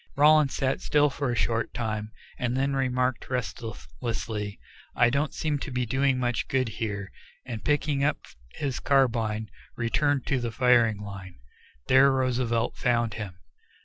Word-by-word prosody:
Rowland 150 0 +6
sat 135 -1 -1
still 150 -1 +3
for 135 -1 -2
a - - -1
short 115 0 0
time, 110 -2 -3 0.3
and 125 +1 -1
then 135 +1 +1
remarked 125 -1 0
restlessly, 110 - -4 0.4
"I 120 0 +4
don't 140 +3 0
seem 150 -2 -1
to - - -5
be 125 -1 -1
doing 130 +3 +1
much 125 -2 -1
good 130 -3 +1
here," 105 -2 -4 0.3
and 115 -4 -6
picking 150 -1 +1
up 145 0 +2 0.4
his 135 -3 -3
carbine, 115 -5 +1 0.2
returned 140 +3 +1
to 135 - +1
the 120 -1 -2
firing 115 -3 +3
line. 95 -3 -8 0.5
There 135 +2 +6
Roosevelt 125 -3 0
found 120 -3 +1
him. 100 -5 -6
125 Hz, 145 wpm, -27 LUFS, 110-135 Hz, 0.5 s, Rowland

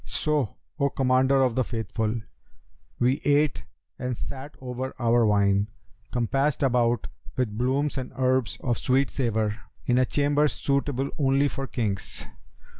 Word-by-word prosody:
So, 150 - -1 0.2
O 140 0 +3
Commander 130 +1 +3
of 125 -2 +2
the 130 - +2
Faithful, 110 -1 -2 0.8
we 125 +3 +2
ate, 145 -1 +2 0.3
and 125 -1 -2
sat 135 +2 -7
over 130 +1 -5
our 120 -1 +3
wine, 100 -1 +3 0.4
compassed 135 +5 +1
about 120 -3 +2 0.3
with 120 -5 0
blooms 135 +5 0
and 130 - -6
herbs 130 -1 +1
of 120 -2 0
sweet 135 +2 +2
savour, 110 -4 0 0.3
in 125 0 +3
a 130 - +4
chamber 145 +1 +2
suitable 140 -1 -1
only 135 0 +3
for 135 -1 -4
kings. 105 -7 -2
130 Hz, 135 wpm, -26 LUFS, 115-135 Hz, 0.8 s, a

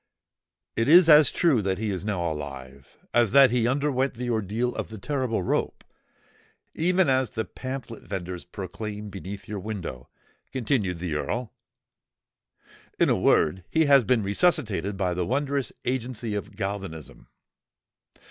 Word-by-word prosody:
"It 115 - 0
is 175 +1 +8
as 150 -2 +8
true 150 -10 +3
that 95 -1 -1
he 110 -1 -2
is 95 -2 -4
now 90 -6 -1
alive 70 -3 -8 0.2
as 120 -2 +3
that 135 -3 +7
he 120 -1 +2
underwent 135 -1 0
the 120 +1 -3
ordeal 110 +3 -1
of - - -5
the 110 - -8
terrible 130 -3 -2
rope, - - -1 0.9
even 180 +1 +2
as 130 -3 +2
the 110 +1 -3
pamphlet 130 -3 -7
venders 90 -2 -5
proclaimed 105 +3 -7
beneath 95 +2 -8
your 105 -1 -4
window," 90 - -6 0.4
continued 110 -8 0
the 85 -1 -4
Earl. 110 +9 -3 1.5
"In - - +4
a - - +4
word, 85 +4 +2
he 160 0 +3
has 140 -3 +6
been 115 -1 +2
resuscitated 100 - +1
by 95 -2 0
the 90 +1 -1
wondrous 140 +5 -1
agency 120 -3 -2
of 105 - -5
galvanism." 95 -6 -6
110 Hz, 145 wpm, -26 LUFS, 95-130 Hz, 1.5 s, is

